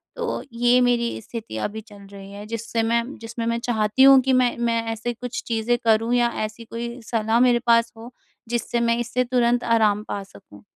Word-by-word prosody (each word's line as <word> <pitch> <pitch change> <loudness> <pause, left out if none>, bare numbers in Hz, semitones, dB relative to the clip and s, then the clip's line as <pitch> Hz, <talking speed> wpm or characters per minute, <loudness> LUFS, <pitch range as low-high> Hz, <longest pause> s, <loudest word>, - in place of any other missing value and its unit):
तो 475 -1 -3
ये 240 +1 +3
मेरी 240 -1 +1
स्थिति 230 +1 -7
अभी 220 +1 -4
चल 205 -2 -16
रही 195 0 -11
है। 205 +1 -9
जिससे 230 +1 -3
मैं 235 +1 +1 0.2
जिसमें 230 0 -6
मैं 230 0 0
चाहती 220 +1 +2
हूँ 270 0 +9
कि 260 +1 +1
मैं 255 -1 +2
मैं 235 -1 0
ऐसे 235 +2 -4
कुछ 245 +1 -6
चीज़ें 230 +1 0
करूँ 225 +1 +2
या 240 -1 +3 0.2
ऐसी 215 +2 -9
कोई 235 +2 -6
सलाह 225 0 +1
मेरे 245 -1 +4
पास 230 0 +4
हो 230 +2 -10 0.4
जिससे 240 0 -1
मैं 235 0 +1
इससे 240 +1 -1
तुरंत 245 -1 +1
आराम 215 -3 +2
पा 200 - -3
सकूँ। 100 - -17
235 Hz, 195 wpm, -23 LUFS, 220-240 Hz, 0.4 s, हूँ